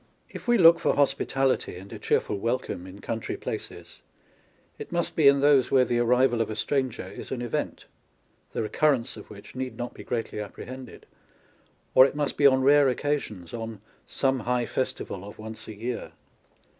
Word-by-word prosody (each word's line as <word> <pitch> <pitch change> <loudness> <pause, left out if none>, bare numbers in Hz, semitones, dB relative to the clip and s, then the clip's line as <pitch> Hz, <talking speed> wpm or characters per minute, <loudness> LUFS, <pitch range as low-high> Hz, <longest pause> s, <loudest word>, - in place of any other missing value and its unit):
If - - -9
we 240 0 +5
look 170 -3 +7
for - - +1
hospi 140 -1 +2
tality 135 -9 0
and 95 +2 -11
a - - -7
cheerful 100 - 0
welcome 115 -5 -2
in 95 +2 -11
country 115 -1 -4
places, - - -7 0.8
it - - -8
must 170 0 -1
be 155 -3 +5
in 140 0 +6
those 140 -3 +5
where 130 -1 +4
the 120 0 0
arrival 120 0 +3
of 115 - -1
a 110 - -4
stranger 130 -1 -1
is 95 - -9
an 120 -2 -3
event, 120 - -3 0.7
the - - -2
recurrence 130 +1 +1
of - - -12
which 100 -1 -12
need 130 0 -5
not 120 0 -5
be - - -10
greatly 115 -2 -3
apprehended, 130 +5 -8 0.9
or 130 - +9
it - - -7
must 145 -1 -1
be 140 - +6
on 130 -1 +3
rare 140 0 +6
occasions, 125 - -3
on 115 -2 -5 0.2
" - - -37
some 135 -1 +1
high 125 +1 0
festival 100 -7 -3
of 105 - -10
once 110 0 -9
a 110 - -8
year." 115 +3 -4
125 Hz, 185 wpm, -26 LUFS, 110-135 Hz, 0.9 s, or